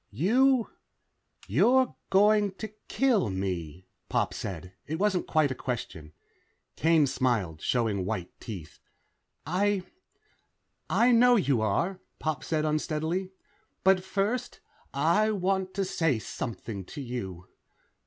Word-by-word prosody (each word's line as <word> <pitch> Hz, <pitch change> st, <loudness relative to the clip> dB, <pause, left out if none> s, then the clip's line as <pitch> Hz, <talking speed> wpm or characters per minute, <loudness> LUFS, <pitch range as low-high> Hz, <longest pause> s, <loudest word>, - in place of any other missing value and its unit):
"You... 245 Hz, -, +3 dB, 0.8 s
you're 240 Hz, -, +3 dB
going 205 Hz, 0 st, +4 dB
to 220 Hz, +3 st, -6 dB, 0.2 s
kill 235 Hz, -, +2 dB
me," 90 Hz, -3 st, -4 dB, 0.2 s
Pop -, -, 0 dB
said. 90 Hz, -1 st, -6 dB
It 160 Hz, -, -2 dB
wasn't 195 Hz, -1 st, 0 dB
a 150 Hz, -4 st, +4 dB
question. 90 Hz, -12 st, -5 dB, 0.6 s
Kane 160 Hz, -1 st, +4 dB
smiled, 120 Hz, -, -1 dB
showing 110 Hz, -6 st, 0 dB
white 90 Hz, -3 st, -3 dB
teeth. 95 Hz, -9 st, -8 dB, 0.7 s
"I... 190 Hz, +4 st, +1 dB, 1.1 s
I 245 Hz, +2 st, +4 dB
know 245 Hz, +1 st, +6 dB
you 140 Hz, -, +2 dB
are," 170 Hz, -, 0 dB, 0.2 s
Pop 155 Hz, -4 st, -2 dB
said 155 Hz, -1 st, 0 dB
unsteadily. 160 Hz, +4 st, -1 dB, 0.5 s
"But 190 Hz, -1 st, +4 dB
first, 205 Hz, +6 st, -2 dB, 0.3 s
I 170 Hz, +10 st, +2 dB
want 190 Hz, -2 st, -1 dB
to 195 Hz, -1 st, 0 dB
say 165 Hz, -8 st, +1 dB
something 110 Hz, -2 st, -5 dB
to 150 Hz, -, -9 dB
you." 95 Hz, -9 st, -6 dB
155 Hz, 115 wpm, -28 LUFS, -, 1.1 s, know